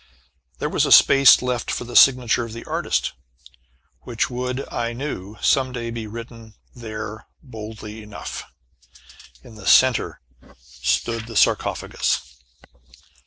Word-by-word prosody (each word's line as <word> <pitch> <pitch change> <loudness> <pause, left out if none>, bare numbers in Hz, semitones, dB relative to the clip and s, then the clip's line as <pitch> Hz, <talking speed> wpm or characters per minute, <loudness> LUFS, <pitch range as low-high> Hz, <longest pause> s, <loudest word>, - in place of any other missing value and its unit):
There - - -2
was - - +1
a - - -2
space 135 -2 +7
left 125 -2 -2
for - - -2
the 120 0 -9
signature 125 -3 +5
of 115 -1 -8
the 115 - -9
artist, - - -1 0.9
which 120 +1 -3
would, 125 +2 -4
I 120 0 -2
knew, 115 -6 -6
some 130 -1 +2
day 120 -2 -5
be 115 -2 -6
written 115 0 -10 0.2
there 110 -2 -7 0.2
boldly 110 -3 -9
enough! 105 -1 -8 0.9
In - - -14
the 105 -2 -10
centre 130 -2 +4 0.4
stood 65 - -2
the 115 - -9
sarcophagus. 70 -8 0
115 Hz, 125 wpm, -22 LUFS, 110-125 Hz, 0.9 s, space